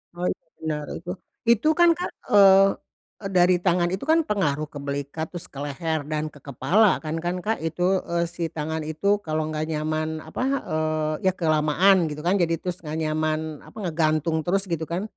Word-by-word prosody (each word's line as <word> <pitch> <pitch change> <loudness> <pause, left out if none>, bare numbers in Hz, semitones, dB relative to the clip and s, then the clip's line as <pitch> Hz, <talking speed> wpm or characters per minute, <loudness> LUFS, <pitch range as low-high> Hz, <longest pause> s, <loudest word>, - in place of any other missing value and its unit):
Oh, 175 +1 -3
itu - - -8 0.2
benar 150 -2 -2
itu 170 +2 -8 0.4
itu 235 +4 +4
kan 345 0 +7
Kak, 355 - -3 0.2
eee 195 -1 +8 0.6
eee, 195 - -3
dari 180 0 +5
tangan 175 -1 +2
itu 190 - -3
kan 325 - +5
pengaruh 155 -8 0
ke - - -9
belikat 140 +3 -3
terus 175 - -7
ke 135 - -9
leher 160 +2 -2
dan 155 0 -1
ke 145 - -14
kepala 145 - +3 0.2
kan 155 0 -3
kan 175 +1 -1
Kak 220 +1 0
itu, 165 +2 -3 0.2
eee, 170 0 0
si 170 +1 -10
tangan 160 +1 -3
itu 155 +5 -3 0.2
kalau 155 0 -1
enggak 155 0 -2
nyaman 155 +1 -2
apa, 160 - -5 0.3
eee, 155 0 -1
ya - - +5
kelamaan 165 +3 +3
gitu 150 0 -6
kan 180 +3 +2
jadi 170 -1 +2
terus 180 -1 -3
enggak 155 0 -4
nyaman 155 0 0 0.3
apa - - -15
ngegantung 160 -1 +1
terus 195 +2 +1
gitu 165 -1 -1
kan, 175 +3 -2
160 Hz, 190 wpm, -24 LUFS, 155-180 Hz, 0.6 s, eee